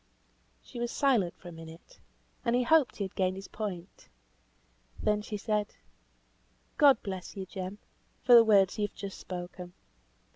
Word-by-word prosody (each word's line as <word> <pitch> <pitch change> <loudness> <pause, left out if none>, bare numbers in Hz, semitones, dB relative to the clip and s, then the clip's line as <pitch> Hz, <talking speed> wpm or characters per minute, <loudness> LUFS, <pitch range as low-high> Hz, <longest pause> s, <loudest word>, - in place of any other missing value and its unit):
She 240 - -9
was 240 0 -1
silent 235 -13 +1
for 175 - -11
a - - -9
minute, 165 0 -13 0.4
and 235 - +1
he 250 - +2
hoped 310 +1 +3
he 205 - -3
had 190 - -6
gained 185 -1 0
his 195 0 -8
point. 190 -4 -7 0.9
Then 210 -1 +1
she 210 0 -5
said, 210 0 -2 1.0
"God 280 -2 +6
bless 190 0 -6
you, 190 - -4
Jem, 190 +1 -6 0.5
for 250 - +5
the 235 -1 +10
words 200 -3 +4
you 205 - +1
have - - -28
just 200 -1 -7
spoken. 180 0 -7
200 Hz, 160 wpm, -30 LUFS, 185-230 Hz, 1.0 s, the